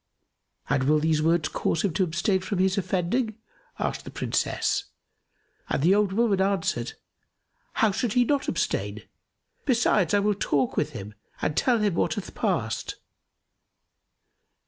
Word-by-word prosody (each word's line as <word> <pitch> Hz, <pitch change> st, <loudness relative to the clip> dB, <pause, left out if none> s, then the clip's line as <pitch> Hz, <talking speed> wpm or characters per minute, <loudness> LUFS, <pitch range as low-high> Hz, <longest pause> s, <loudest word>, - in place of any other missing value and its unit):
"And 135 Hz, 0 st, +1 dB
will 150 Hz, +2 st, +4 dB
these 155 Hz, 0 st, +1 dB
words 165 Hz, 0 st, +2 dB
cause 165 Hz, -, -1 dB
him 195 Hz, -5 st, 0 dB
to 190 Hz, -, +2 dB
abstain 185 Hz, +3 st, +1 dB
from 190 Hz, +1 st, -3 dB
his 190 Hz, +1 st, +2 dB
offending?" 195 Hz, +5 st, -1 dB, 0.4 s
asked -, -, -2 dB
the -, -, -8 dB
Princess; -, -, -1 dB, 0.8 s
and 135 Hz, -, 0 dB
the 180 Hz, +4 st, +5 dB
old 205 Hz, -1 st, +2 dB
woman 205 Hz, -2 st, +2 dB
answered, 190 Hz, -11 st, 0 dB, 0.8 s
"How 220 Hz, -, +3 dB
should 215 Hz, +2 st, -1 dB
he 245 Hz, -1 st, +4 dB
not 285 Hz, +2 st, 0 dB
abstain? -, -, -2 dB, 0.6 s
Besides, 230 Hz, -7 st, +2 dB
I -, -, +4 dB
will 205 Hz, +1 st, +2 dB
talk 140 Hz, -9 st, 0 dB
with -, -, -1 dB
him 100 Hz, +2 st, -7 dB, 0.3 s
and 150 Hz, -, -1 dB
tell 245 Hz, -, +3 dB
him 210 Hz, -3 st, +1 dB
what -, -, 0 dB
hath -, -, -6 dB
passed." -, -, -1 dB
190 Hz, 145 wpm, -26 LUFS, 160-210 Hz, 0.8 s, the